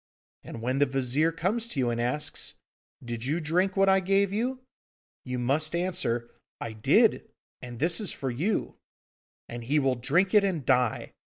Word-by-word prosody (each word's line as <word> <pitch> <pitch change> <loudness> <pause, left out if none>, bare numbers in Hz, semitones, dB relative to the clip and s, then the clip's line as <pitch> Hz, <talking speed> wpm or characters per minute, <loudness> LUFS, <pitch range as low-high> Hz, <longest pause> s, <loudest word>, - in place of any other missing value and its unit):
And 115 - -8
when 130 +3 0
the 145 - +4
Vizir 135 +4 +1
comes 200 +8 -1
to 155 - -5
you 120 -2 +1
and 120 0 -2
asks, 135 +5 -2 0.5
"Did 120 -1 -4
you 150 +6 0
drink 180 +5 0
what 195 0 +4
I 190 0 +5
gave 195 +1 +1
you?" 250 +5 -1 0.7
you 125 -1 -3
must 145 +6 0
answer, 170 -10 -1 0.3
"I 115 - -5
did, 110 - +3 0.3
and 120 -1 -8
this 165 - +2
is 205 - -3
for 135 -2 -3
you," 170 - -2 0.7
and 120 0 -7
he 145 +5 +1
will 135 -3 +2
drink 150 +10 +1
it 210 -1 +6
and 175 -9 -1
die! 125 -2 +1
150 Hz, 175 wpm, -27 LUFS, 125-185 Hz, 0.7 s, it